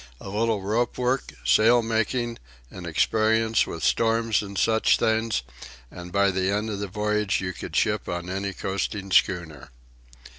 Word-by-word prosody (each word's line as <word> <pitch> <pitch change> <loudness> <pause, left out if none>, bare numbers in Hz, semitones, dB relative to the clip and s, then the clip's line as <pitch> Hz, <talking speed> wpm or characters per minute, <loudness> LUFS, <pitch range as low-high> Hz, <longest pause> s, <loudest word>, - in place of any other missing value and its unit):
A - - -9
little 105 0 0
rope 115 +5 -1
work, 125 +2 -1
sail 115 - +5
making, 115 +1 -1 0.3
and 90 -2 -8
experience 110 +6 +2
with 80 -2 -6
storms 115 +2 +2
and 100 -1 -7
such 110 +3 +3
things, 110 -1 0 0.5
and 90 0 -9
by 100 0 +3
the 95 0 0
end 105 +2 -1
of 100 - -4
the 100 - -3
voyage 105 0 0
you 95 0 -3
could - - -8
ship - - 0
on 85 0 -4
any 100 +2 -3
coasting 95 +1 -4
schooner." 85 -7 +1
105 Hz, 155 wpm, -25 LUFS, 95-115 Hz, 0.5 s, sail